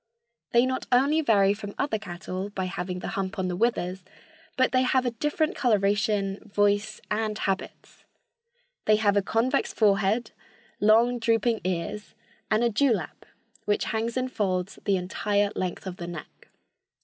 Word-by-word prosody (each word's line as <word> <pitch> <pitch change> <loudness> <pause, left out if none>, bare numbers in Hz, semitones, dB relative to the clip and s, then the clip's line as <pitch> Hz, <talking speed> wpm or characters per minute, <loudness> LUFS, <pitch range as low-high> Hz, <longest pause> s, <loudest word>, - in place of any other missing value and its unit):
They 235 +1 +5
not 260 0 -2
only 280 +6 +4
vary 200 -8 +4
from 205 -1 -8
other 275 -6 0
cattle 185 +1 -5
by 190 -2 -3
having 180 -1 -4
the 180 - -5
hump 195 -3 -3
on 185 -1 -1
the 180 - -2
withers, 190 -4 0 0.5
but 255 0 +3
they 255 - +3
have 255 0 +2
a 245 - +1
different 295 +6 -1
coloration, 205 -3 +1
voice 205 0 +1
and 215 0 -1
habits. 195 -2 -4 0.8
They 215 - +5
have 210 -2 +2
a 200 - +4
convex 225 +5 0
forehead, 210 +2 +2 0.5
long, 230 +4 +4
drooping 230 0 +1
ears 185 +3 -3 0.3
and 215 +2 +2
a 240 - +3
dew 250 +4 +3
lap, - - -6 0.4
which 205 - +1
hangs 230 +2 -1
in 255 0 -1
folds 190 -4 -2
the 200 -2 +3
entire 200 +3 0
length 185 0 -3
of 185 -1 -6
the 170 - -6
neck. 170 -3 -9
210 Hz, 160 wpm, -26 LUFS, 195-235 Hz, 0.8 s, They